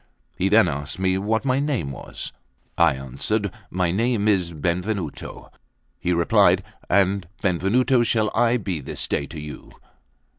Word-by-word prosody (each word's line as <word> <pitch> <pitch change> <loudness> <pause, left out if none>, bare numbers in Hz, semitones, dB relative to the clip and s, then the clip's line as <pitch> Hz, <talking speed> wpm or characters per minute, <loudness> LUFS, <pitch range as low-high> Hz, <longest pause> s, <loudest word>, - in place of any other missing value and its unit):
He 95 +2 +1
then 110 -1 +6
asked 70 -2 -4
me 95 0 +1
what 110 +5 0
my 130 0 +2
name 135 - -1
was. 65 - -6 0.4
I 85 -5 +4
answered: 70 - -2 0.2
"My 90 -1 0
name 110 +2 +1
is 90 -5 +2
Benvenuto." 85 +2 -3 0.5
He 90 - -1
replied: 90 +1 +4 0.3
"And 95 -1 +2 0.2
Benvenuto 110 - +2
shall 110 -2 +1
I 120 +1 +3
be 95 -8 -3
this - - -3
day 70 - -1
to 80 - -8
you. 75 0 -9
95 Hz, 145 wpm, -23 LUFS, 85-110 Hz, 0.5 s, then